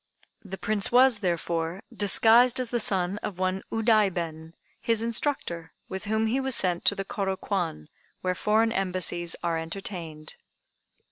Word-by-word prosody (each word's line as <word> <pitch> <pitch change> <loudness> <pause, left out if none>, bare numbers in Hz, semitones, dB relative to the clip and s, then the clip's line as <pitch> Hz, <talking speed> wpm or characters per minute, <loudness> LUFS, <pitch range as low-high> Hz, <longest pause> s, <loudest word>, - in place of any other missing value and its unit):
The 195 -2 -7
Prince 210 +3 -1
was, 250 -2 +5
therefore, 170 -1 -2
disguised 230 +5 +5
as 250 -2 -2
the 240 - 0
son 190 -2 +2
of 200 -4 -6
one 185 +1 -1
Udaiben, 185 -8 0 0.3
his 230 -1 0
instructor, 230 - -2 0.2
with 190 +2 -6
whom 220 +1 0
he 235 +5 0
was 265 -2 -1
sent 180 -2 -1
to - - +4
the 195 - -4
Kôro 195 -3 -3
Kwan, 170 - -3 0.3
where 185 0 0
foreign 220 +4 +2
embassies 180 -4 -1
are 165 -1 0
entertained. 165 -3 -7
195 Hz, 145 wpm, -26 LUFS, 175-225 Hz, 0.3 s, was